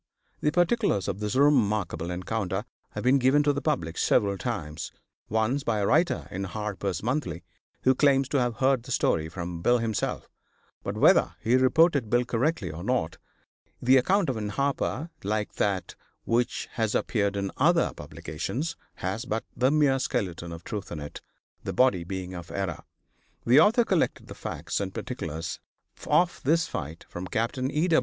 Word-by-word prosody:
The 150 - +2
particulars 175 - +2
of 95 - -2
this 105 +1 -2
remarkable 110 - +2
encounter 95 +2 -2 0.3
have - - -4
been 130 +2 +4
given 135 +3 +4
to 145 0 +3
the 145 - -3
public 105 - -1
several 100 -4 +3
times, 85 -9 -4 0.4
once 110 +6 +1
by 115 -4 0
a 100 - +1
writer 155 - +2
in 95 +1 -3
Harper's 100 -2 -3
Monthly, 125 - -2 0.4
who 130 - +5
claims 135 -1 +3
to 140 - +2
have 120 -2 0
heard 130 0 +2
the - - -10
story 80 -1 +1
from 85 0 -5
Bill 120 +7 +4
himself, 115 -2 -2 0.5
but - - -4
whether - - +5
he 120 +3 +2
reported 130 -1 +4
Bill 120 +1 +2
correctly 120 - 0
or 80 +3 -7
not, 100 -9 -1 0.6
the 130 +2 +4
account 185 +9 +3
in 110 -4 -3
Harper, 140 +6 -1
like 105 +1 -1
that 100 -2 0 0.3
which 120 +1 0
has 110 -4 -1
appeared 100 -3 0
in 100 -1 -2
other 165 +4 +3
publications, 80 - -4 0.2
has 95 +6 -3
but 115 +1 -2
the 125 +2 +3
mere 145 -3 +3
skeleton 85 -8 -2
of 85 0 -8
truth 105 -3 -5
in 80 - -4
it, 75 0 -8 0.4
the - - -3
body 125 -9 +3
being 95 +1 -5
of 85 -2 -8
error. 95 -4 -3 0.6
The 125 +5 +6
author 225 +7 +5
collected 185 -6 0
the - - -6
facts - - -4
and - - -4
particulars 80 +2 -4 0.5
of 175 0 +2
this 165 +4 +3
fight 80 +1 -6
from 90 +1 -6
Capt. 115 +7 -1
E. 145 +6 0
115 Hz, 165 wpm, -27 LUFS, 95-135 Hz, 0.6 s, The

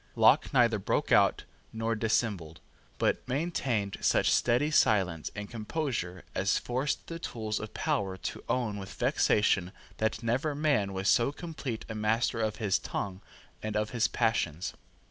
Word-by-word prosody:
Locke - - +5
neither 115 -3 +4
broke 95 - -1
out - - +4 0.3
nor 115 0 -1
dissembled, 105 -7 -1 0.4
but - - +1
maintained 125 - -1
such - - +3
steady 125 +6 +2
silence 95 - +2
and 105 0 -5
composure 110 - -3
as 100 +2 +1
forced 130 +4 -2
the 165 0 -6
tools 110 -9 -3
of 110 - -8
power 95 -2 -1
to - - -5
own 110 -5 0
with 95 - -8
vexation 95 -3 +2 0.3
that 110 +1 -1
never 130 +6 0
man 140 -10 +1
was 95 +1 -2
so 120 +6 +4
complete 145 -7 -6
a 110 - -5
master 110 +2 0
of 110 -1 0
his 105 -3 +1
tongue 95 -1 -4 0.4
and 110 -1 -2
of 105 0 -1
his 115 -3 +2
passions. 95 -8 0
110 Hz, 150 wpm, -30 LUFS, 100-125 Hz, 0.4 s, Locke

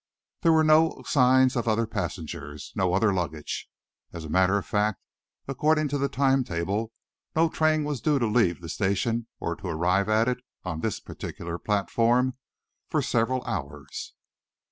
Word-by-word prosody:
There 165 - +4
were 160 -1 +5
no 155 +1 +4
signs 130 -1 +4
of 120 -1 -1
other 115 +1 +2
passengers, 80 -8 -5
no 95 -2 +1
other 100 +1 +3
luggage. 80 -5 -3 0.4
As 85 -2 -7
a - - -7
matter 95 +3 +3
of 100 - -3
fact, 105 -2 0 0.5
according 150 +2 +1
to 145 +1 -1
the 140 0 0
time 135 -1 +2
table, 100 +4 -2 0.4
no 165 +1 +4
train 155 -1 +2
was 145 -4 -3
due 150 -2 +2
to 120 - +1
leave 105 -6 +2
the 85 - -8
station 110 +6 0
or 85 - -2
to - - -7
arrive 90 +4 +1
at 110 +2 +3
it, 125 0 0 0.2
on 80 - -4
this 110 - -2
particular 85 0 -7
platform, 115 +5 +1 0.5
for - - +1
several 125 +2 0
hours. 70 -3 -6
110 Hz, 165 wpm, -26 LUFS, 90-130 Hz, 0.5 s, were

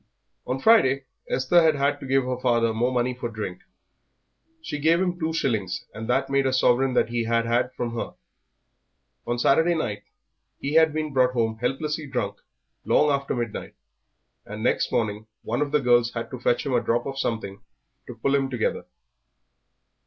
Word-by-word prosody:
On 130 - -1
Friday 135 - +4 0.3
Esther 130 +7 +3
had 160 -2 +4
had 140 +1 0
to 135 - -8
give 135 0 +2
her 125 0 -3
father 115 -3 +2
more 120 +3 0
money 125 0 0
for 120 -1 -5
drink. 105 -5 -6 1.0
She 150 - -5
gave 165 +3 +3
him 180 -1 -1
two 160 -1 -1
shillings, 110 - -1
and 110 +1 -7
that 135 +2 +1
made 135 0 +1
a 130 - 0
sovereign 130 0 +3
that - - +2
he 120 -1 -1
had 115 0 +1
had 120 +2 +1
from 120 -2 -3
her. 115 - -4 1.1
On 120 - -1
Saturday 160 +8 +3
night 110 -10 -3 0.6
he 140 +2 -3
had 160 0 +5
been 155 -1 -3
brought 125 -1 +3
home 110 -2 -1
helplessly 150 +4 -2
drunk 105 -7 -3 0.5
long 150 0 +3
after 140 -1 -1
midnight, 120 -3 -5 0.7
and 105 +1 -7
next - - +1
morning 110 -2 -1 0.2
one 120 +5 -2
of 145 -1 -1
the 150 - +3
girls 120 -2 +3
had 115 -1 -5
to 130 - -6
fetch 120 0 +1
him 135 - -1
a 120 - +3
drop 120 +1 0
of 135 0 -5
something 100 -6 -3 0.5
to 125 - -8
pull 135 +4 0
him 135 -1 +1
together. 120 -4 -2
125 Hz, 180 wpm, -25 LUFS, 115-140 Hz, 1.1 s, had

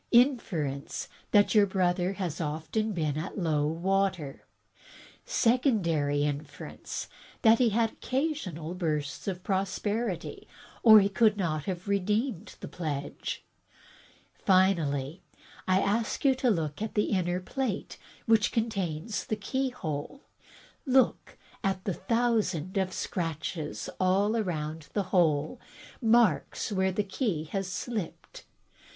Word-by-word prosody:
Inference 195 - +1 0.2
that 205 -1 +4
your 210 -2 +6
brother 185 0 +1
was 175 -4 -2
often 160 +7 -2 0.2
at 170 +7 -5
low 155 -5 +1
water. 180 -2 -1 0.8
Secondary 190 - +2
inference 145 +1 -5 0.2
— - - -24
that 225 -1 +6
he 245 -2 +4
had 225 +1 +1
occasional 250 - -3
bursts 155 -5 -2
of 185 -2 -3
prosperity, 195 +1 -2 0.3
or 220 -2 +9
he 195 - +3
could 210 +1 +3
not 155 -6 -1
have 185 0 -4
redeemed 210 +2 -1
the - - -6
pledge. 145 -5 -4 0.9
Finally, 170 -6 +2 0.5
I 185 0 +4
ask 215 +7 0
you 270 - +6
to 255 -1 +1
look 160 -5 -1
at 220 - -4
the 210 - +1
inner 180 -2 +1
plate, 230 +2 -3 0.3
which 225 -2 +4
contains 205 -5 -2
the 215 - 0
keyhole. 245 - -3 0.6
Look 265 -2 +2 0.3
at 190 -2 0
the 195 - 0
thousand 205 -5 0
of 190 -1 +1
scratches 165 -3 -3
all 190 +3 +3
round 155 -4 -4
the 205 - +1
hole 160 - +2 0.2
— - - -20
marks 225 - +3
where 190 -1 +1
the 205 +3 0
key 195 - -1
has 195 -2 -2
slipped. 210 -2 -5
190 Hz, 120 wpm, -29 LUFS, 160-220 Hz, 0.9 s, or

